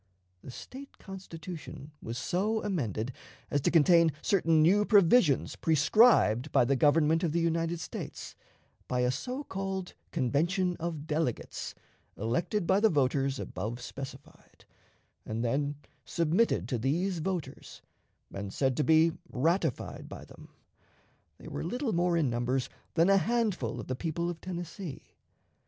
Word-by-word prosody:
The - - -10
State 265 - -10
Constitution 170 -5 -9
was 115 +2 -5
so 205 - -1
amended 125 - -2 0.4
as 145 - +1
to - - +2
contain 165 0 +5
certain 165 -5 +3
new 185 +7 +5
provisions 200 - +4
prescribed 155 - +4
by - - +4
the 135 +3 +2
Government 155 +4 +3
of 160 -3 0
the 170 - +2
United 165 0 0
States - - -7 0.5
by 125 0 0
a 125 0 +2
so 255 - -4
called 195 -4 -4 0.2
convention 175 - +1
of 160 -3 -4
delegates 155 -6 -3 0.4
elected 170 - -1
by 190 +3 +3
the 220 +1 +4
voters 135 -2 +1
above 110 +5 -5
specified, 135 +2 -10 0.6
and 110 +2 -3
then 140 +4 0 0.3
submitted 170 +7 +1
to 125 - -1
these 170 - 0
voters, 175 -1 -5 0.5
and 100 0 -5
said 135 +2 0
to 150 - +2
be 160 +1 +5 0.2
ratified 165 +9 -1
by - - -9
them. - - -15 0.9
They - - -12
were - - -5
little 250 -2 -2
more 175 0 +2
in 155 -4 +2
numbers 125 +2 -1 0.3
than 165 +1 +4
a 195 0 +5
handful 200 - 0
of 115 - -6
the 130 - -3
people 170 +4 -2
of 170 - -10
Tennessee. 175 -3 -7
165 Hz, 140 wpm, -30 LUFS, 135-185 Hz, 0.9 s, contain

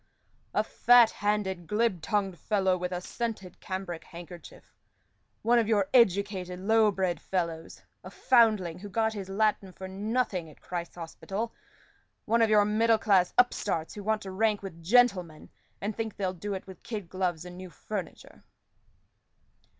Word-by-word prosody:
"A - - +3
fat 240 -2 +5
handed, 205 -4 -1
glib 210 -3 +1
tongued 195 0 -1
fellow, 190 -3 +1
with 180 0 -4
a 180 0 -3
scented 210 -4 -5
cambric 185 -3 -5
handkerchief; 175 0 -12 0.7
one 235 +2 +4
of 225 - +1
your 205 -4 +2
educated 195 -5 +2
low 220 +2 +4
bred 190 -3 -1
fellows; 170 -3 -3 0.2
a - - -8
foundling 215 - +3
who 205 +2 -8
got 220 +2 0
his 195 -3 -6
Latin 200 -1 0
for 190 +1 -8
nothing 200 -3 -2
at 150 - -17
Christ's 170 -1 -6
Hospital; 195 +6 -5 0.7
one 230 +2 +2
of 225 - +4
your 210 -1 +5
middle 225 +2 +3
class 195 -5 +3
upstarts 205 -9 +1
who 205 - -8
want 220 +1 0
to 190 - -6
rank 210 +1 +1
with 170 -4 -8
gentlemen, 185 -6 +2 0.3
and 210 +1 -3
think 220 -2 -4
they'll 185 -2 -1
do 200 +3 -4
it 190 - -7
with 190 -2 -12
kid 210 -6 -6
gloves 180 -2 -2
and 180 0 -9
new 185 0 -9
furniture." 190 -1 -7
195 Hz, 160 wpm, -28 LUFS, 180-220 Hz, 0.7 s, fat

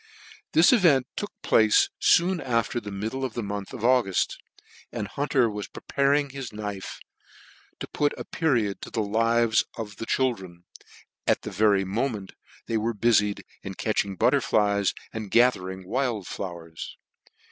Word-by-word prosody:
This 170 +9 +6
event 160 - +4
took 205 - -4
place 395 -1 +4 0.3
loon 180 +1 -1
after 120 -2 0
the 105 -3 -8
middle 110 +7 -4
of 130 -4 -3
the 120 - -2
month 100 -1 -5
of 130 - -8
Auguft, 120 -7 +2 0.6
and 110 -4 -4
Hunter 140 0 +1
was 105 -2 -5
preparing 140 0 0
his 135 -2 -6
knife 105 -2 -6 0.8
to - - -5
put 145 0 -1
a - - -6
period 120 -11 0
to - - -7
the 110 - -1
live" 115 +2 +2 0.2
of 105 -3 -6
the 115 - -6
children, 95 -10 -1 0.6
at - - +2
the - - -5
very 100 -2 +3
moment 105 0 -2 0.3
they 115 - -1
xvere 115 +1 -1
bufied 105 -3 +2 0.2
in 95 -1 -7
catching 100 -2 -1
butterflies, 105 -5 +2 0.2
and 110 -2 -5
ga 120 +4 +6
thering 95 -2 -8
wild 120 -2 -1
flowers. 85 -4 -7
115 Hz, 150 wpm, -26 LUFS, 100-130 Hz, 0.8 s, This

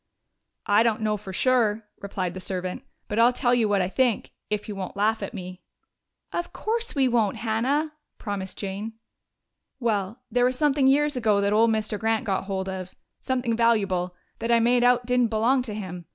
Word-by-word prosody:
"I 205 +2 +4
don't 225 -1 +1
know 215 -1 +1
for 200 -2 -8
sure," 225 0 +2 0.2
replied 190 -3 -3
the 185 - -6
servant. 185 +5 -4 0.2
"But 210 - -2
I'll 235 +2 +6
tell 245 -1 +1
you 230 -3 +2
what 200 -2 +2
I - - 0
think 240 +2 0 0.2
if 210 0 -2
you 210 - -5
won't 195 0 -6
laugh 220 +2 +1
at - - -5
me." 185 -1 -7 0.7
"Of 345 0 -3
course 460 -1 -2
we 270 -2 +3
won't, 230 -5 +1
Hannah," 260 +8 0 0.2
promised 200 -3 -5
Jane. 200 +3 -5 0.9
"Well, 220 -2 -1
there 245 0 +3
was 255 0 +1
something 285 -2 +3
years 295 +2 +3
ago 220 -5 +2
that 200 +1 +1
old 225 +2 +5
Mr. 215 -1 -1
Grant 225 0 0
got 195 -2 -1
hold 190 -1 -3
of 185 -1 -6 0.2
something 250 -3 -1
valuable 195 -6 +1 0.2
that 230 - -1
I 235 - +6
made 240 +1 +3
out 245 0 +4
didn't 250 -1 +2
belong 230 +4 +2
to 225 -4 -5
him. 180 -4 -7
220 Hz, 190 wpm, -25 LUFS, 200-245 Hz, 0.9 s, I'll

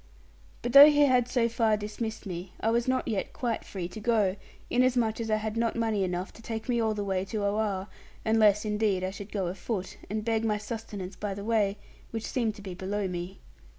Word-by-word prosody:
But 240 - -2
though 285 +2 +12
he 295 -1 +3
had 250 -3 +3
so 245 -2 +2
far 225 -2 +2
dismissed 215 +2 -5
me, 180 -1 -6
I 225 - +1
was 235 +1 +1
not 260 0 +1
yet 210 -4 -2
quite 235 -3 -2
free 185 -3 -5
to 200 - -8
go, 210 -4 +2 0.3
inasmuch 245 -3 +2
as 225 - -3
I 215 - +3
had 215 0 -3
not 230 0 0
money 225 -4 +1
enough 180 0 -3
to - - -14
take 225 0 -5
me 240 -2 +1
all 220 -1 +1
the 205 - -2
way 190 -2 0
to 210 +1 -3
Oare, 200 -2 0 0.4
unless 215 -2 +4
indeed 210 -3 +1
I 185 - -1
should 200 +1 -9
go 195 -3 -1
afoot, 185 +2 -4
and 215 +1 -3
beg 225 -1 +1
my 215 -2 +1
sustenance 210 -3 -6
by 205 -2 -4
the 200 +1 -6
way, 210 -3 +2 0.3
which 225 -1 -4
seemed 230 -5 -1
to 205 - -11
be 190 -2 -6
below 195 +2 -2
me. 180 +1 -6
215 Hz, 220 wpm, -28 LUFS, 195-230 Hz, 0.4 s, though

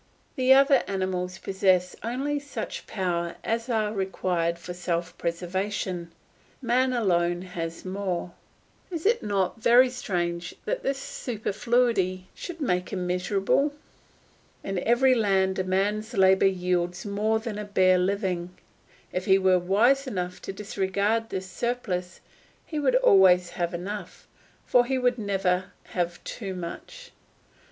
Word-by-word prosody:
The 260 0 +2
other 275 -1 +6
animals 185 -1 -2
possess 185 -2 +1
only 270 +6 -2
such 285 0 -6
powers 170 -3 -2
as 230 +2 -2
are 215 -2 0
required 180 -4 -1
for 180 +1 -7
self 175 -1 -3
preservation; 180 0 -3 0.5
man 255 +1 +2
alone 175 -7 +1
has 170 -2 -6
more. 185 -2 -3 0.6
Is 335 -2 -5
it 460 +3 +3
not 200 +1 -1
very 245 +3 +6
strange 175 -7 -3
that - - -1
this 275 0 -1
superfluity 220 -6 -1
should 345 -2 -8
make 180 - 0
him 185 -2 -2
miserable? 195 +10 +1 0.9
In 195 -2 -2
every 255 +3 +5
land 195 -4 +2
a - - +1
man's 205 +5 -1
labour 190 0 +5
yields 180 0 -1
more 210 +2 +1
than 220 -2 -5
a - - -3
bare 185 -3 +3
living. 180 -2 -1 0.6
If 180 0 -2
he 190 -2 +5
were 185 -1 +4
wise 235 +10 +3
enough 180 -5 -4
to - - -5
disregard 200 +3 -1
this 190 0 -4
surplus 185 -3 -3 0.4
he 310 - -4
would 265 -4 +2
always 185 -7 +5
have 175 -1 -2
enough, 185 +1 -6 0.4
for 245 - +4
he 265 +1 0
would 250 -1 +1
never 190 -3 0 0.2
have 175 -1 -2
too 195 -5 -5
much. 485 - -8
195 Hz, 135 wpm, -26 LUFS, 180-235 Hz, 0.9 s, other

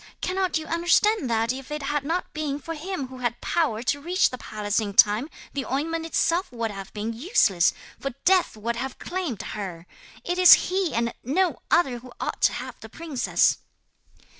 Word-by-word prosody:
cannot 370 -1 0
you 315 - -5
understand 345 - +2
that 230 +1 +1
if 265 +1 -8
it 300 -1 -4
had 290 0 -1
not 335 +5 -2
been 300 -2 -2
for 330 +3 -6
him 320 -4 -5
who 260 -1 -10
had 240 -1 -2
power 260 -10 0
to 285 +3 0
reach 360 +5 +2
the 255 - -5
palace 210 0 -2
in 205 -3 -4
time 215 +9 +5 0.2
the 275 - -2
ointment 325 +5 -2
itself 335 +1 +1
would 230 -2 -3
have 195 -1 -8
been 215 +2 -3
useless, 225 - +3 0.3
for 275 - -3 0.2
death 370 -10 +3
would 235 +2 -3
have 260 +2 -4
claimed 350 - -4
her? 185 -5 -6 0.4
It 355 +1 -2
is 365 - +10 0.2
he 375 -3 +1
and 235 0 0
no 345 +9 +1
other 265 -8 +2
who 250 +1 -13
ought - - -4
to - - +4
have - - -7
the - - -11
princess!' 315 -6 +1
275 Hz, 190 wpm, -25 LUFS, 230-335 Hz, 0.4 s, is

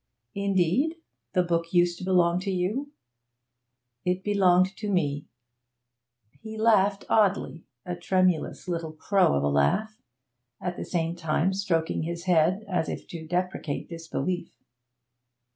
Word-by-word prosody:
'Indeed? 200 - +1 0.4
The 180 - +3
book 170 -1 -1
used 175 -1 +3
to - - -7
belong 180 -2 +3
to 190 +2 -4
you?' 200 +10 -1 1.1
'It 180 +1 -1
belonged 190 -2 +3
to 210 - -4
me.' 145 -6 0 1.1
He 220 0 -8
laughed 205 -3 +3
oddly, 200 -6 +1 0.2
a 180 - -3
tremulous 180 -1 0
little 165 -3 -3
crow 190 - +2
of 70 - 0
a - - +2
laugh, 135 - +1 0.6
at 180 -1 -3
the - - -5
same 170 -1 -1
time 170 +2 0
stroking 175 -5 0
his 170 +1 -4
head, 180 +3 +2
as 180 -4 -1
if - - -6
to 160 -2 -7
deprecate 175 -4 -2
disbelief. 165 +1 -3
180 Hz, 130 wpm, -27 LUFS, 165-195 Hz, 1.1 s, The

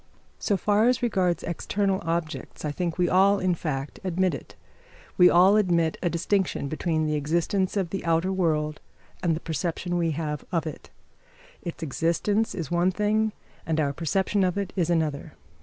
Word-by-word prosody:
So 200 - +1
far 210 +4 +3
as 250 0 +2
regards 185 -7 +1
external 190 +3 -1
objects, 165 -2 -3
I 150 - -1
think 170 +2 -3
we 180 -1 +2
all, 195 +3 +4
in 185 -2 +1
fact, 145 -4 -4
admit 185 0 +1
it. - - -8 0.6
We 180 -1 +7
all 185 +4 +6
admit 170 -5 +2
a 175 - +1
distinction, 175 -2 0
between 155 +1 -1
the 155 - 0
existence 170 +7 0
of 185 -4 -1
the 195 - -3
outer 165 +3 +1
world 155 -4 0 0.4
and 170 -3 +1
the - - -4
perception 175 +2 -2
we 165 -1 +1
have 150 -2 -3
of 165 -3 0
it; 155 - -7 0.7
its 170 -1 -6
existence 170 +8 0
is 165 -6 -5
one 175 +1 +3
thing, 210 +3 +1 0.3
and 160 -1 -1
our 140 -2 +1
perception 190 +6 0
of 180 0 0
it 200 -2 -3
is 175 -4 0
another. 155 -4 -1
175 Hz, 175 wpm, -26 LUFS, 160-190 Hz, 0.7 s, We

